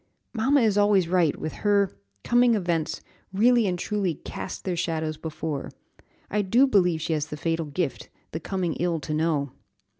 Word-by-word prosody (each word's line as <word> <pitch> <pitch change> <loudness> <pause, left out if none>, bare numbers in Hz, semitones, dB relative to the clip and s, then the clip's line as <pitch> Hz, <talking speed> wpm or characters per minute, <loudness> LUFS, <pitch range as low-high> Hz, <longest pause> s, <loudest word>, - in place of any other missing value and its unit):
"Mamma 265 +5 +3
is 210 -3 +3
always 205 -4 +4
right; 175 -4 +2
with 155 - -4
her 200 -2 +3 0.3
'coming 240 -1 +4
events' 170 -6 -1 0.3
really 230 +3 +4
and 180 -1 -1
truly 195 -2 -1
'cast - - -7
their 185 -2 -2
shadows 160 -2 -2
before.' 155 -2 -5 0.6
I 210 - +2
do 230 +7 +4
believe 180 -10 +2
she 160 - -1
has 150 -1 -1
the 150 - -6
fatal 165 0 -1
gift, 145 -2 -3 0.2
the 160 - -4
coming 180 -1 -2
ill 170 -2 0
to 150 +1 -4
know!" 150 -3 0
175 Hz, 170 wpm, -25 LUFS, 160-205 Hz, 0.6 s, always